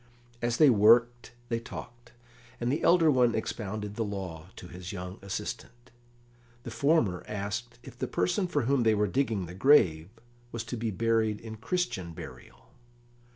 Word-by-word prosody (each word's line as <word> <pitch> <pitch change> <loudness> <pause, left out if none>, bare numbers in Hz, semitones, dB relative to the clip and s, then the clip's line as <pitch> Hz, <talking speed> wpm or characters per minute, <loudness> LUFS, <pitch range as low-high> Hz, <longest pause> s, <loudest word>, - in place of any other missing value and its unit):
As 120 0 0
they 150 -4 +7
worked 120 +3 +4 0.2
they 115 -1 0
talked, 120 +1 -10 0.5
and 120 +1 0
the 145 - -1
elder 170 -3 +5
one 125 -3 +3
expounded 105 -1 -4
the 115 - 0
law 95 -6 -6
to 90 - -10
his 90 0 -8
young 90 -1 -7
assistant. 120 +5 -6 0.7
The - - -7
former 140 - +1
asked 105 +3 -4
if - - -13
the - - -2
person 180 - 0
for 145 -6 0
whom 135 +2 +2
they 110 -2 +3
were 105 0 +2
digging 110 -4 -1
the 85 - -9
grave 90 - +4 0.4
was 115 -1 -4
to 115 +2 -5
be 115 -1 -2
buried 110 +1 +1
in 110 -1 -9
Christian 115 - -2
burial. - - -12
115 Hz, 160 wpm, -29 LUFS, 100-120 Hz, 0.7 s, they